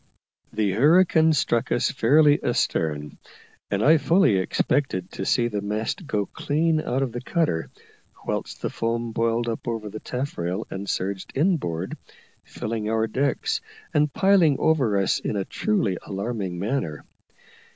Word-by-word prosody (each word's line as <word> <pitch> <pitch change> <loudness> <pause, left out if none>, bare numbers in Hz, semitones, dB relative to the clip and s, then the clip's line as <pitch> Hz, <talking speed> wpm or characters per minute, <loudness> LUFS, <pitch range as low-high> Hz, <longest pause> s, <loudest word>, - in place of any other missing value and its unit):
The 105 -3 0
hurricane 160 - +4
struck 130 -5 0
us 120 - +2
fairly 145 +4 +4
astern, 75 -2 -1 0.5
and 100 +2 0
I 160 +3 +6
fully 165 - +3
expected 95 0 0
to 95 - -5
see 120 -1 +2
the 105 -3 -3
mast 110 - -3
go 105 -5 0
clean 155 +6 0
out 135 0 -1
of 130 - -3
the 120 +1 -5
cutter, 150 - -1 0.6
whilst - - -4
the - - -1
foam 115 0 -2
boiled 115 +1 0
up 115 +1 -4
over 115 -2 -3
the 110 - -6
taffrail 110 -8 -3
and 100 +1 -5
surged 95 0 -3
inboard, 135 - -1 0.4
filling 110 -1 -4
our 110 0 +1
decks, 135 +4 -1 0.3
and 150 -1 +2
piling 185 -7 +4
over 130 -10 +2
us 95 -1 +1
in - - -3
a 100 -2 -1
truly 190 - 0
alarming 100 -2 -4
manner. 95 - -3
115 Hz, 145 wpm, -24 LUFS, 100-145 Hz, 0.6 s, I